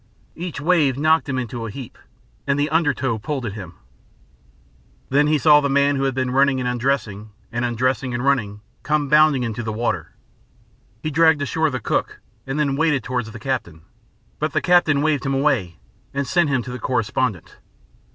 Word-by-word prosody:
Each 170 Hz, -3 st, -6 dB
wave 150 Hz, -4 st, +2 dB
knocked 155 Hz, +1 st, +2 dB
him 130 Hz, -, -1 dB
into 120 Hz, -2 st, -4 dB
a -, -, -6 dB
heap, 125 Hz, +2 st, -9 dB, 0.5 s
and 140 Hz, 0 st, +1 dB
the 145 Hz, +1 st, 0 dB
under 160 Hz, -2 st, +3 dB
tow 130 Hz, -5 st, -2 dB
pulled 135 Hz, +3 st, -4 dB
at 105 Hz, -, -4 dB
him. 95 Hz, -5 st, -9 dB, 1.3 s
Then 145 Hz, +2 st, +3 dB
he 155 Hz, 0 st, +3 dB
saw 150 Hz, 0 st, +6 dB
the 140 Hz, -, 0 dB
man 140 Hz, +1 st, +3 dB
who 135 Hz, 0 st, 0 dB
had 135 Hz, -2 st, -1 dB
been 130 Hz, -1 st, -1 dB
running 135 Hz, 0 st, +3 dB
and 125 Hz, -, -2 dB
undressing, 120 Hz, -4 st, -2 dB, 0.2 s
and 120 Hz, +1 st, -2 dB
undressing 125 Hz, +1 st, 0 dB
and 120 Hz, +2 st, -3 dB
running, 105 Hz, -7 st, 0 dB, 0.2 s
come 150 Hz, -1 st, 0 dB
bounding 150 Hz, -3 st, +4 dB
into 115 Hz, 0 st, -3 dB
the 110 Hz, -1 st, -3 dB
water. 115 Hz, +3 st, -2 dB, 0.9 s
He 155 Hz, -, -2 dB
dragged 160 Hz, -1 st, +4 dB
ashore 160 Hz, +3 st, 0 dB
the 130 Hz, -2 st, -3 dB
cook, -, -, -2 dB, 0.3 s
and 135 Hz, +3 st, -2 dB
then 140 Hz, -2 st, +1 dB
waded 150 Hz, -4 st, +1 dB
towards 125 Hz, -3 st, -3 dB
the 115 Hz, -, -9 dB
captain, 95 Hz, -, -4 dB, 0.6 s
but -, -, -2 dB
the -, -, +2 dB
captain 160 Hz, -5 st, +3 dB
waved 150 Hz, -4 st, +1 dB
him 135 Hz, 0 st, -1 dB
away, 125 Hz, -, 0 dB, 0.4 s
and 140 Hz, 0 st, -1 dB
sent 175 Hz, +2 st, +2 dB
him 130 Hz, -3 st, 0 dB
to 125 Hz, -, -7 dB
the 125 Hz, -, -6 dB
correspondent. 115 Hz, -4 st, -2 dB
135 Hz, 190 wpm, -21 LUFS, 120-150 Hz, 1.3 s, saw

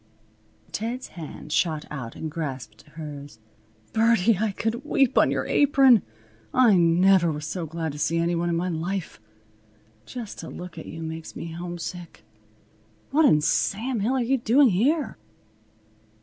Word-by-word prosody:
Ted's 235 Hz, +4 st, -4 dB
hand 160 Hz, -3 st, -9 dB
shot 155 Hz, -1 st, 0 dB
out 125 Hz, -6 st, -6 dB
and 155 Hz, -, -5 dB
grasped 130 Hz, -9 st, -6 dB
hers. 145 Hz, -5 st, -8 dB, 0.6 s
"Birdie! 225 Hz, -3 st, +3 dB
I 215 Hz, -1 st, +1 dB
could 225 Hz, +5 st, -3 dB
weep 270 Hz, -3 st, +2 dB
on -, -, +5 dB
your -, -, -1 dB
apron! 270 Hz, -6 st, +5 dB, 0.5 s
I 245 Hz, -5 st, +6 dB
never 175 Hz, +1 st, +4 dB
was 150 Hz, 0 st, -5 dB
so 165 Hz, 0 st, -4 dB
glad 160 Hz, 0 st, -3 dB
to 145 Hz, -, -9 dB
see 165 Hz, +3 st, +1 dB
any 170 Hz, +1 st, +1 dB
one 170 Hz, 0 st, 0 dB
in 170 Hz, -, 0 dB
my 175 Hz, +2 st, -1 dB
life. 175 Hz, -, -4 dB, 0.9 s
Just 235 Hz, -5 st, -7 dB
to -, -, -7 dB
look 175 Hz, -2 st, -8 dB
at -, -, -9 dB
you 165 Hz, +1 st, -7 dB
makes 160 Hz, 0 st, -7 dB
me 165 Hz, -, -6 dB
homesick. 175 Hz, 0 st, -7 dB, 0.9 s
What 310 Hz, +3 st, +4 dB
in 150 Hz, -, +5 dB
Sam 220 Hz, -, 0 dB
Hill 220 Hz, +6 st, 0 dB
are 255 Hz, -, +1 dB
you 265 Hz, +2 st, +1 dB
doing 245 Hz, +4 st, +5 dB
here?" 260 Hz, -, +1 dB
175 Hz, 155 wpm, -25 LUFS, 160-230 Hz, 0.9 s, I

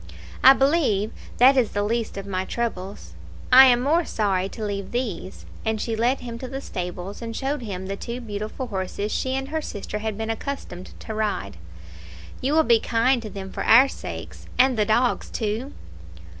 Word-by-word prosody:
"I 265 Hz, -, +10 dB
believe 270 Hz, -, +2 dB, 0.3 s
that 260 Hz, +3 st, +7 dB
is 250 Hz, -5 st, +2 dB
the 205 Hz, -, 0 dB
least 230 Hz, 0 st, -2 dB
of 195 Hz, -, -5 dB
my 185 Hz, -2 st, -2 dB
troubles. 200 Hz, -3 st, -4 dB, 0.4 s
I 260 Hz, +1 st, +10 dB
am 245 Hz, -1 st, +5 dB
more 315 Hz, +6 st, +3 dB
sorry 195 Hz, -, 0 dB
to 220 Hz, 0 st, -6 dB
leave 200 Hz, -1 st, -4 dB
these;" 220 Hz, -7 st, -4 dB, 0.2 s
and 220 Hz, -1 st, -1 dB
she 225 Hz, +1 st, -2 dB
led 240 Hz, +5 st, +1 dB
him 235 Hz, -1 st, -6 dB
to 255 Hz, -, -6 dB
the 270 Hz, +2 st, -5 dB
stables, 180 Hz, -3 st, -6 dB
and 230 Hz, -1 st, -5 dB
showed 275 Hz, +2 st, -2 dB
him 190 Hz, -5 st, -5 dB
the 195 Hz, +1 st, -3 dB
two 235 Hz, +4 st, -5 dB
beautiful 215 Hz, +2 st, -5 dB
horses 200 Hz, -1 st, -3 dB
she 260 Hz, 0 st, -1 dB
and 270 Hz, 0 st, -3 dB
her 315 Hz, +1 st, -1 dB
sister 210 Hz, -5 st, -5 dB
had 215 Hz, -1 st, -3 dB
been 225 Hz, 0 st, -2 dB
accustomed 225 Hz, -6 st, -6 dB
to 220 Hz, -, -6 dB
ride. 210 Hz, -, -2 dB, 0.8 s
"You 270 Hz, +3 st, 0 dB
will 320 Hz, 0 st, +5 dB
be 235 Hz, -5 st, +4 dB
kind 240 Hz, +3 st, +2 dB
to 220 Hz, -, -7 dB
them 190 Hz, -2 st, -7 dB
for -, -, -4 dB
our 255 Hz, +5 st, +7 dB
sakes, -, -, -8 dB
and 255 Hz, 0 st, +5 dB
the 215 Hz, -2 st, +2 dB
dogs, 240 Hz, +4 st, +1 dB
too. 225 Hz, +5 st, -3 dB
225 Hz, 190 wpm, -24 LUFS, 205-255 Hz, 0.8 s, I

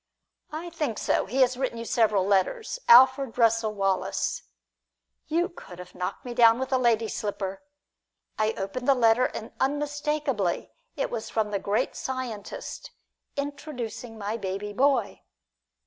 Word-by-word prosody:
"I 330 Hz, +3 st, -6 dB
think 300 Hz, -9 st, -2 dB
so; -, -, 0 dB
he 260 Hz, +7 st, 0 dB
has 255 Hz, -1 st, +3 dB
written 260 Hz, -3 st, -2 dB
you 230 Hz, -, -5 dB
several 215 Hz, -5 st, +2 dB
letters 430 Hz, -, 0 dB
Alfred 260 Hz, +1 st, +7 dB
Russel 225 Hz, -2 st, +3 dB
Wallace!" 195 Hz, -2 st, 0 dB, 0.9 s
You 340 Hz, +3 st, +1 dB
could 265 Hz, -, -12 dB
have 180 Hz, 0 st, -11 dB
knocked 180 Hz, -, -5 dB
me 245 Hz, -, -5 dB
down 230 Hz, -1 st, +6 dB
with 265 Hz, +1 st, -3 dB
a 260 Hz, -, +3 dB
lady's 230 Hz, -3 st, +2 dB
slipper. 200 Hz, -2 st, -4 dB, 0.7 s
I 215 Hz, 0 st, +1 dB
opened 220 Hz, +6 st, -4 dB
the 275 Hz, -, +6 dB
letter 235 Hz, 0 st, +4 dB
and 225 Hz, -, -5 dB
unmistakably 290 Hz, -, -1 dB, 0.2 s
it 280 Hz, -, -2 dB
was 230 Hz, -2 st, -4 dB
from 215 Hz, -2 st, -1 dB
the 200 Hz, -, 0 dB
great 210 Hz, +6 st, -1 dB
scientist, 250 Hz, -6 st, -5 dB, 0.5 s
"introducing 265 Hz, -5 st, -5 dB
my 210 Hz, +2 st, -3 dB
baby 200 Hz, 0 st, -4 dB
boy." 265 Hz, -2 st, +1 dB
235 Hz, 145 wpm, -27 LUFS, 210-270 Hz, 0.9 s, Alfred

